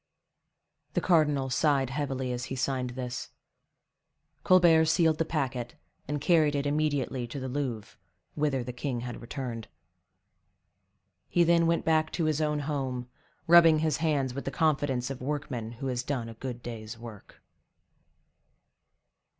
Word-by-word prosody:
The -, -, +3 dB
cardinal 150 Hz, -6 st, +2 dB
sighed 135 Hz, -1 st, +2 dB
heavily 135 Hz, -2 st, -2 dB
as 125 Hz, 0 st, -3 dB
he 135 Hz, -, -5 dB
signed 130 Hz, -1 st, -1 dB
this; 125 Hz, -1 st, -5 dB, 1.1 s
Colbert 170 Hz, -3 st, +6 dB
sealed 160 Hz, 0 st, +3 dB
the 165 Hz, -, +2 dB
packet, 130 Hz, -6 st, -3 dB, 0.3 s
and 145 Hz, +1 st, -2 dB
carried 155 Hz, -1 st, +3 dB
it 140 Hz, 0 st, -1 dB
immediately 145 Hz, -4 st, 0 dB
to 130 Hz, +4 st, -6 dB
the 130 Hz, -, -4 dB
Louvre, 125 Hz, -6 st, -4 dB, 0.3 s
whither 145 Hz, -4 st, 0 dB
the 125 Hz, 0 st, -6 dB
king 125 Hz, -1 st, -3 dB
had 120 Hz, -1 st, -6 dB
returned. 120 Hz, -2 st, -5 dB, 1.6 s
He 175 Hz, -, +4 dB
then 170 Hz, 0 st, +4 dB
went 170 Hz, 0 st, +1 dB
back 155 Hz, -1 st, +2 dB
to 165 Hz, -, 0 dB
his 155 Hz, 0 st, +1 dB
own 150 Hz, -1 st, 0 dB
home, 135 Hz, -4 st, -3 dB, 0.4 s
rubbing 165 Hz, -1 st, +7 dB
his 155 Hz, -2 st, +1 dB
hands 145 Hz, -5 st, 0 dB
with 140 Hz, -, -6 dB
the -, -, -1 dB
confidence 140 Hz, -5 st, 0 dB
of 130 Hz, -, -7 dB
workman 125 Hz, -5 st, -4 dB
who 125 Hz, +4 st, -7 dB
has 125 Hz, -2 st, -1 dB
done 125 Hz, -3 st, -3 dB
a -, -, -8 dB
good 120 Hz, +1 st, -7 dB
day's 115 Hz, -1 st, -7 dB
work. 115 Hz, -4 st, -12 dB
135 Hz, 145 wpm, -29 LUFS, 125-155 Hz, 1.6 s, rubbing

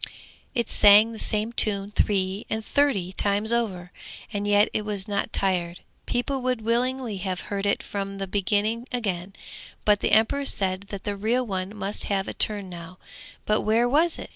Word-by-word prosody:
_ -, -, -17 dB, 0.5 s
It 235 Hz, -3 st, 0 dB
sang 210 Hz, +2 st, +6 dB
the 225 Hz, -, -8 dB
same 215 Hz, +2 st, -1 dB
tune 200 Hz, -3 st, +1 dB
three 195 Hz, -1 st, 0 dB
and 220 Hz, 0 st, -3 dB
thirty 245 Hz, -11 st, +1 dB
times 205 Hz, +4 st, 0 dB
over, 190 Hz, -7 st, -2 dB, 0.4 s
and 205 Hz, 0 st, -2 dB
yet 205 Hz, +1 st, +5 dB
it 215 Hz, -, 0 dB
was 205 Hz, -2 st, -4 dB
not 200 Hz, -1 st, -2 dB
tired; 180 Hz, -3 st, 0 dB, 0.3 s
people 260 Hz, +2 st, -1 dB
would 250 Hz, -3 st, -1 dB
willingly 240 Hz, -1 st, 0 dB
have 185 Hz, 0 st, -4 dB
heard 200 Hz, 0 st, -1 dB
it 200 Hz, -, +1 dB
from 195 Hz, -1 st, -5 dB
the 195 Hz, -, -3 dB
beginning 210 Hz, +5 st, 0 dB
again, 195 Hz, -6 st, -2 dB, 0.5 s
but 210 Hz, -1 st, +4 dB
the -, -, 0 dB
emperor 225 Hz, +6 st, +3 dB
said 190 Hz, -4 st, 0 dB
that 200 Hz, -2 st, -6 dB
the 205 Hz, -, -2 dB
real 230 Hz, +5 st, 0 dB
one 190 Hz, -1 st, -4 dB
must 200 Hz, +1 st, -3 dB
have 195 Hz, -1 st, -1 dB
a -, -, -4 dB
turn 205 Hz, -3 st, +1 dB
now 175 Hz, 0 st, -10 dB, 0.5 s
but 215 Hz, 0 st, +2 dB
where 225 Hz, +3 st, +2 dB
was 320 Hz, +6 st, +2 dB
it? -, -, -8 dB
205 Hz, 185 wpm, -25 LUFS, 195-230 Hz, 0.5 s, sang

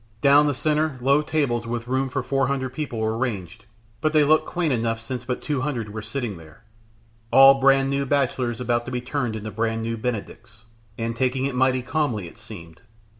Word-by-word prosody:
Down 145 Hz, +1 st, +6 dB
the 145 Hz, -, 0 dB
centre 155 Hz, +1 st, 0 dB
low 140 Hz, +4 st, +3 dB
tables 140 Hz, -7 st, -1 dB
with 120 Hz, 0 st, -4 dB
room 130 Hz, +1 st, 0 dB
for 135 Hz, 0 st, -2 dB
four 135 Hz, 0 st, 0 dB
hundred 130 Hz, -1 st, -2 dB
people 140 Hz, -4 st, -4 dB
were 110 Hz, 0 st, 0 dB
ranged, 110 Hz, -9 st, -4 dB, 0.4 s
but 155 Hz, 0 st, +1 dB
they 155 Hz, -1 st, +5 dB
looked 155 Hz, +2 st, +3 dB
quaint 170 Hz, -5 st, 0 dB
enough 115 Hz, -1 st, -1 dB
since 120 Hz, +2 st, -6 dB
but 125 Hz, 0 st, -3 dB
two 145 Hz, -4 st, -1 dB
hundred 125 Hz, -7 st, -3 dB
were 110 Hz, -, -5 dB
sitting 110 Hz, -2 st, -4 dB
there, 80 Hz, -2 st, -16 dB, 0.7 s
all 135 Hz, 0 st, +8 dB
brand 135 Hz, 0 st, +4 dB
new 140 Hz, 0 st, -1 dB
bachelors 125 Hz, -4 st, 0 dB
about 120 Hz, -1 st, 0 dB
to 130 Hz, -, -6 dB
be 125 Hz, -, -1 dB
turned 125 Hz, -2 st, -3 dB
into 110 Hz, 0 st, -6 dB
brand 115 Hz, +1 st, -1 dB
new 115 Hz, 0 st, -3 dB
Benedicts, 115 Hz, -1 st, -6 dB, 0.3 s
and 115 Hz, 0 st, -3 dB
taking 130 Hz, +2 st, 0 dB
it 140 Hz, -, -2 dB
mightily 130 Hz, 0 st, +2 dB
calmly 130 Hz, -, -1 dB
it 95 Hz, -, -14 dB
seemed. 85 Hz, -7 st, -11 dB
125 Hz, 200 wpm, -23 LUFS, 115-140 Hz, 0.7 s, all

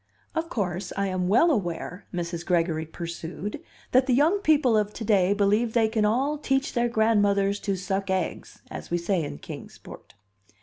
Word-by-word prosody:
"Of 325 Hz, 0 st, -2 dB
course, 185 Hz, -, -3 dB
I 200 Hz, 0 st, 0 dB
am 185 Hz, -1 st, -1 dB
well 245 Hz, -, +5 dB
aware," 180 Hz, -, -3 dB
Mrs. 170 Hz, -1 st, -4 dB
Gregory 165 Hz, -3 st, 0 dB
pursued, 170 Hz, +4 st, -6 dB, 0.3 s
"that 255 Hz, +1 st, +4 dB
the 250 Hz, -, +3 dB
young 320 Hz, +9 st, +3 dB
people 295 Hz, -, +3 dB
of 210 Hz, -1 st, +1 dB
to 225 Hz, -, -5 dB
day 195 Hz, -3 st, +3 dB
believe 205 Hz, +3 st, +2 dB
they 225 Hz, -2 st, +4 dB
can 220 Hz, -1 st, +1 dB
all 270 Hz, +8 st, +1 dB
'teach 270 Hz, -1 st, 0 dB
their 240 Hz, -2 st, +1 dB
grandmothers 205 Hz, -3 st, +2 dB
to 200 Hz, -2 st, -1 dB
suck 195 Hz, +1 st, -3 dB
eggs,' 190 Hz, -2 st, -3 dB
as -, -, -7 dB
we 175 Hz, -, +1 dB
say 175 Hz, 0 st, 0 dB
in 110 Hz, -, -6 dB
Kings -, -, -9 dB
Port." -, -, -13 dB
205 Hz, 180 wpm, -26 LUFS, 180-240 Hz, 0.3 s, well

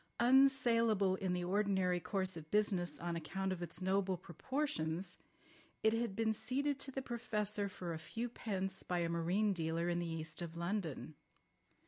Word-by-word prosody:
Unsaleable 235 Hz, -6 st, +5 dB
in 190 Hz, -2 st, 0 dB
the 180 Hz, 0 st, -1 dB
ordinary 190 Hz, -1 st, +2 dB
course 185 Hz, +1 st, -1 dB
of 155 Hz, -2 st, -8 dB
business 195 Hz, -4 st, +1 dB
on 170 Hz, 0 st, -3 dB
account 190 Hz, +4 st, -2 dB
of 180 Hz, -, -6 dB
its 175 Hz, +2 st, -4 dB
noble 190 Hz, 0 st, +2 dB
proportions, 175 Hz, -, -2 dB, 0.6 s
it 220 Hz, 0 st, +5 dB
had 225 Hz, -3 st, 0 dB
been 220 Hz, 0 st, +2 dB
ceded 275 Hz, +5 st, 0 dB
to 270 Hz, -, -1 dB
the 270 Hz, 0 st, -4 dB
Professor 210 Hz, -4 st, -1 dB
for 175 Hz, -3 st, -5 dB
a 160 Hz, -, -4 dB
few 225 Hz, +9 st, -3 dB
pence 195 Hz, -5 st, -3 dB
by 180 Hz, -, -1 dB
a 170 Hz, -1 st, +1 dB
marine 180 Hz, +5 st, +2 dB
dealer 165 Hz, 0 st, 0 dB
in 175 Hz, 0 st, +1 dB
the 175 Hz, -, -2 dB
east 160 Hz, 0 st, -5 dB
of 170 Hz, -1 st, -5 dB
London. 170 Hz, -4 st, -2 dB
190 Hz, 165 wpm, -37 LUFS, 175-220 Hz, 0.6 s, Unsaleable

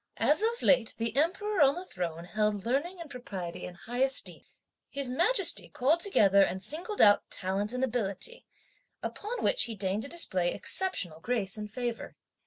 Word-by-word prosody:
As 305 Hz, +6 st, +3 dB
of 465 Hz, +2 st, 0 dB
late 250 Hz, -5 st, +3 dB
the 230 Hz, +2 st, -2 dB
Emperor 370 Hz, +6 st, 0 dB
on 280 Hz, 0 st, +5 dB
the 360 Hz, +2 st, -6 dB
Throne 170 Hz, -, -5 dB
held 210 Hz, 0 st, -1 dB
learning 295 Hz, +10 st, -2 dB
and 335 Hz, -, -8 dB
propriety 195 Hz, -10 st, -7 dB
in 180 Hz, -, -11 dB
high 240 Hz, +7 st, -7 dB
esteem, 265 Hz, 0 st, 0 dB, 0.5 s
His 275 Hz, -2 st, -3 dB
Majesty 355 Hz, -, +5 dB
called 290 Hz, +7 st, +1 dB
together 200 Hz, -, +4 dB
and 190 Hz, -1 st, +1 dB
singled 350 Hz, -, -3 dB
out 205 Hz, -1 st, +5 dB
talent 195 Hz, +3 st, -2 dB
and 250 Hz, +1 st, -2 dB
ability, 205 Hz, -6 st, -3 dB, 0.6 s
upon 450 Hz, +4 st, -5 dB
which -, -, +2 dB
he 230 Hz, -, -6 dB
deigned 195 Hz, +1 st, -2 dB
to 275 Hz, -, -6 dB
display 185 Hz, -, 0 dB
exceptional 195 Hz, -, -1 dB
grace 205 Hz, -2 st, -2 dB
and 210 Hz, -1 st, -7 dB
favour. 240 Hz, 0 st, -5 dB
245 Hz, 170 wpm, -29 LUFS, -, 0.6 s, on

